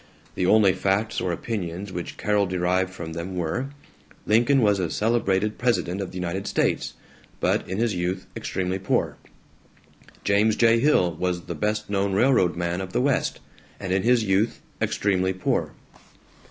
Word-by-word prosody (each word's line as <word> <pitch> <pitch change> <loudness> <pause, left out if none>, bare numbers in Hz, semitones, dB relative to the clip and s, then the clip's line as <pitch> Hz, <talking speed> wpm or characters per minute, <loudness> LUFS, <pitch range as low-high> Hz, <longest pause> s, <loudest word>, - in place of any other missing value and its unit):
The 90 - 0
only 100 -2 +5
facts 100 +4 0
or 90 - -1
opinions 95 0 -4
which 85 -1 -5
Carol 105 -1 +1
derived 90 +1 0
from 85 -3 -7
them 85 +3 -5
were: 90 +10 -2 0.6
Lincoln 120 +5 +4
was 105 -2 +3
a 90 -3 -1
celebrated 105 -1 0
president 105 -6 0
of 95 - -4
the 95 - -8
United 90 +2 -3
States, - - 0 0.4
but - - 0
in 95 - -3
his 115 -1 +1
youth 90 +1 -2
extremely 95 0 -2
poor. 95 - 0 1.1
James 105 +2 +3
J. 115 0 +4
Hill 115 - +3
was 90 -1 -1
the - - -6
best 105 0 -1
known 100 -1 0
railroad 100 -5 +3
man 85 +1 -2
of 95 0 -7
the - - +1
West, 135 0 0 0.4
and 95 -2 -2
in 95 - +2
his 120 +1 +3
youth 100 +2 +1 0.2
extremely 95 -2 +1
poor. 95 - -1
95 Hz, 160 wpm, -24 LUFS, 90-110 Hz, 1.1 s, only